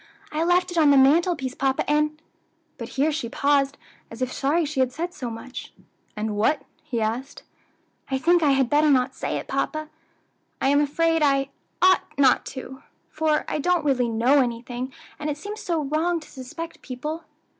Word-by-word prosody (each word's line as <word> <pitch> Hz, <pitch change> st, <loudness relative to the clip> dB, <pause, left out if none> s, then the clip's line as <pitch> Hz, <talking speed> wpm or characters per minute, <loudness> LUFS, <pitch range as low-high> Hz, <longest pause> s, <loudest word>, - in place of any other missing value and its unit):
I 310 Hz, +2 st, 0 dB
left 355 Hz, +1 st, +2 dB
it 345 Hz, -, 0 dB
on 305 Hz, -2 st, +6 dB
the 280 Hz, -, +6 dB
mantelpiece, 280 Hz, 0 st, +3 dB
papa, 270 Hz, 0 st, 0 dB
and 300 Hz, +1 st, +1 dB, 0.3 s
" -, -, -44 dB
But -, -, -6 dB
here 295 Hz, +4 st, +3 dB
she 290 Hz, -6 st, -3 dB
paused, 280 Hz, +1 st, +1 dB, 0.3 s
as 230 Hz, -, -10 dB
if 255 Hz, -, -3 dB
sorry 310 Hz, +5 st, +1 dB
she 295 Hz, -2 st, -3 dB
had 260 Hz, -1 st, +2 dB
said 345 Hz, +6 st, -4 dB
so 255 Hz, -5 st, -5 dB
much. 230 Hz, +3 st, -8 dB, 0.4 s
"And 210 Hz, 0 st, -2 dB
what?" 225 Hz, +8 st, +1 dB, 0.2 s
he 300 Hz, -7 st, -3 dB
asked. 235 Hz, +6 st, -3 dB, 0.7 s
"I 265 Hz, -, 0 dB
think 340 Hz, +5 st, +3 dB
I 290 Hz, -3 st, +4 dB
had 270 Hz, -2 st, +2 dB
better 300 Hz, +3 st, +3 dB
not 260 Hz, -2 st, +3 dB
say -, -, -3 dB
it, -, -, -6 dB
papa! 310 Hz, 0 st, -2 dB, 0.7 s
I'm 285 Hz, +2 st, +3 dB
afraid 325 Hz, +3 st, +1 dB
I 275 Hz, -2 st, +2 dB, 0.3 s
ought 370 Hz, 0 st, +6 dB, 0.2 s
not, 270 Hz, 0 st, +3 dB, 0.6 s
for 310 Hz, -1 st, +1 dB
I -, -, -2 dB
don't 350 Hz, +1 st, +1 dB
really 250 Hz, -4 st, +2 dB
know 240 Hz, +6 st, +3 dB
anything, 245 Hz, +1 st, -3 dB, 0.3 s
and 300 Hz, 0 st, -3 dB
it 295 Hz, -, -2 dB
seems 410 Hz, +7 st, -7 dB
so 335 Hz, -4 st, -1 dB
wrong 320 Hz, +4 st, 0 dB
to 310 Hz, -, -15 dB
suspect 270 Hz, +6 st, -8 dB
people." 300 Hz, +5 st, -5 dB
285 Hz, 180 wpm, -24 LUFS, 260-315 Hz, 0.7 s, on